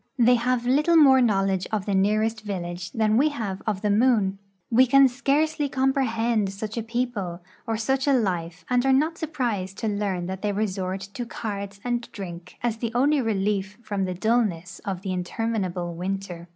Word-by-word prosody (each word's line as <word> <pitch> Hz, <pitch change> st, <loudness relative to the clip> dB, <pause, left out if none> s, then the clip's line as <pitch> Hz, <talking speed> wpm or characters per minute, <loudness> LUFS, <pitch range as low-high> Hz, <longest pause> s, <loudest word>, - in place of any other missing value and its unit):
They 245 Hz, 0 st, +5 dB
have 245 Hz, 0 st, +1 dB
little 300 Hz, +7 st, +4 dB
more 270 Hz, -4 st, +7 dB
knowledge 195 Hz, -5 st, +1 dB
of 210 Hz, -3 st, -1 dB
the 200 Hz, -, -1 dB
nearest 215 Hz, +3 st, +1 dB
vil 200 Hz, -4 st, -4 dB
lage 175 Hz, 0 st, -6 dB
than 220 Hz, -1 st, +2 dB
we 295 Hz, +5 st, +4 dB
have 215 Hz, -10 st, -4 dB
of 205 Hz, -2 st, -1 dB
the 210 Hz, -, +2 dB
moon. 210 Hz, -4 st, +3 dB, 0.3 s
We 255 Hz, +3 st, +5 dB
can 275 Hz, +2 st, +7 dB
scarce!}^ 285 Hz, +3 st, 0 dB
comprehend 235 Hz, -6 st, +1 dB
such 210 Hz, +2 st, -5 dB
a 230 Hz, -, -1 dB
people 225 Hz, -7 st, -3 dB, 0.3 s
or 225 Hz, -1 st, 0 dB
such 265 Hz, +5 st, 0 dB
a 280 Hz, -, +5 dB
life 175 Hz, -8 st, -1 dB
and 245 Hz, -1 st, +2 dB
are 270 Hz, 0 st, +3 dB
not 310 Hz, +5 st, +1 dB
surprised 235 Hz, -, -2 dB
to 225 Hz, -, -2 dB
learn 200 Hz, -4 st, -1 dB
that 190 Hz, +1 st, -5 dB
they 210 Hz, -1 st, -1 dB
resort 190 Hz, -2 st, -2 dB
to 200 Hz, +5 st, -6 dB
cards 200 Hz, -3 st, -5 dB
and 240 Hz, -1 st, -2 dB
drink 180 Hz, -3 st, -8 dB
as 235 Hz, -2 st, 0 dB
the 230 Hz, 0 st, -3 dB
only 280 Hz, +3 st, +3 dB
relief 205 Hz, -2 st, -1 dB
from 200 Hz, -3 st, -2 dB
the 185 Hz, -1 st, -3 dB
dullness 195 Hz, -4 st, 0 dB
of 190 Hz, -2 st, -4 dB
the 190 Hz, -2 st, -2 dB
interminable 185 Hz, -2 st, -2 dB
winter. 180 Hz, -1 st, -5 dB
215 Hz, 185 wpm, -25 LUFS, 190-245 Hz, 0.3 s, more